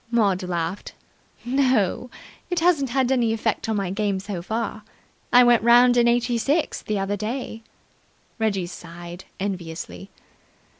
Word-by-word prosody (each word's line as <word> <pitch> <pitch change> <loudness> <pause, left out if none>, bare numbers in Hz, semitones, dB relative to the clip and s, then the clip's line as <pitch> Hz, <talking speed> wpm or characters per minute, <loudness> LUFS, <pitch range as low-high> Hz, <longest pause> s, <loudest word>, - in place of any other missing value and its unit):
Maud 205 -5 +2
laughed. 175 0 -4 0.5
"No. 250 -3 +1 0.4
It 355 - 0
hasn't 325 -6 +2
had 260 +1 +1
any 235 -4 +2
effect 225 0 -1
on 220 - +1
my 195 -3 -1
game 200 -1 -1
so 195 -2 -5
far. 220 +3 -3 0.5
I 245 0 +8
went 240 -1 +5
round 245 +2 +6
in 240 -1 +4
eighty 240 0 +2
six 290 +7 0
the 215 - -2
other 195 +1 -1
day." 225 +2 -4 0.8
Reggie 200 -5 0
sighed 175 0 -10
enviously. 185 0 -5
220 Hz, 140 wpm, -23 LUFS, 190-245 Hz, 0.8 s, I